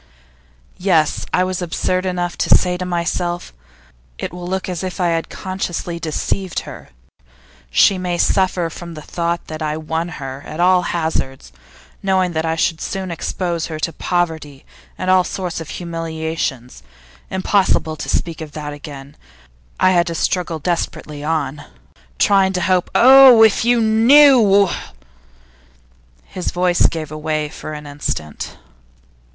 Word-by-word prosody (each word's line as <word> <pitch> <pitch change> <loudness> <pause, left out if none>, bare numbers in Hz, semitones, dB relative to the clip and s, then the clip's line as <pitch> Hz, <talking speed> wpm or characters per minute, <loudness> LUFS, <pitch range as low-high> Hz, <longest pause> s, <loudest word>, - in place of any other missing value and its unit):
Yes, 180 -5 +1
I 180 - +2
was 185 0 -2
absurd 185 +2 -1
enough 175 -1 -2
to - - 0
say 180 -1 -1
to 180 0 -4
myself: 175 - -2 0.6
"It - - -5
will 175 0 -7
look 190 +1 -2
as 180 -1 -4
if 185 0 -5
I 175 -1 +2
had 165 -1 -1
consciously 180 -2 -4
deceived 170 +3 -2
her; - - -11 0.8
she 185 - +4
may 180 -1 -2
suffer 180 -2 +1
from 170 +1 -9
the 155 - -9
thought 170 0 -2
that 155 0 -7
I 155 0 -2
won 160 +2 -3
her 135 0 -7
at 155 - -8
all 180 +1 +4
hazards, 160 -6 -3 0.5
knowing 190 -2 +1
that 160 0 -2
I 160 - 0
should 165 0 0
soon 190 -2 -4
expose 170 0 -3
her 160 - -5
to 165 +1 -2
poverty 160 -6 -2 0.3
and 185 0 0
all 185 -1 +5
sorts 180 -2 -4
of 160 - -8
humiliation." 160 -6 -4 0.6
Impossible 190 -4 +1
to - - -6
speak 165 -2 -2
of 155 -2 -8
that 150 -1 -5
again; 145 -1 -10 0.6
I 185 - +4
had 175 -1 +3
to 170 - -3
struggle 175 -1 -1
desperately 155 -2 -3
on, 150 -2 -2 0.5
trying 195 -1 +3
to 180 - -1
hope. 180 0 +1
Oh! 260 -2 +8
if 220 -1 +4
you 240 0 +3
knew 225 -2 +6 0.8
' - - -33
His 185 - -4
voice 180 -1 +3
gave 155 -2 -5
way 155 0 -2
for 155 0 -8
an 150 0 -8
instant. 145 - -5
170 Hz, 150 wpm, -19 LUFS, 155-185 Hz, 0.8 s, Oh